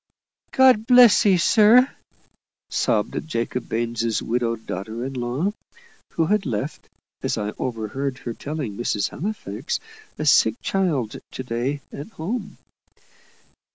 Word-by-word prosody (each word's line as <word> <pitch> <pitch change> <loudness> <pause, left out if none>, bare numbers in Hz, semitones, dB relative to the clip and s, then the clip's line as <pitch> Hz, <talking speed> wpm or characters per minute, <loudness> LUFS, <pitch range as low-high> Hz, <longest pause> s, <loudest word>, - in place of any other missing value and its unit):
"God 255 -4 +4
bless 245 -4 +7
'ee, 190 -2 +5
sir!" 225 +7 +6 0.8
sobbed - - 0
Jacob 120 -3 -3
Baines' 115 0 -1
widowed 115 -1 -2
daughter 110 +6 -5
in 135 - -5
law, 130 +10 -1 0.6
who 165 - +1
had 205 0 +1
left, 125 +6 -4 0.3
as - - -1
I 105 0 -3
overheard 130 +3 -3
her 120 -3 -6
telling 140 -6 -5
Mrs. 105 -2 -1
Halifax, 215 +6 -4 0.4
a 155 - -3
sick 110 -6 +5
child 155 - -1 0.2
to 130 - -5
day 125 +4 -2
at 145 - -7
home. 200 +5 -4
135 Hz, 120 wpm, -23 LUFS, 115-195 Hz, 0.8 s, bless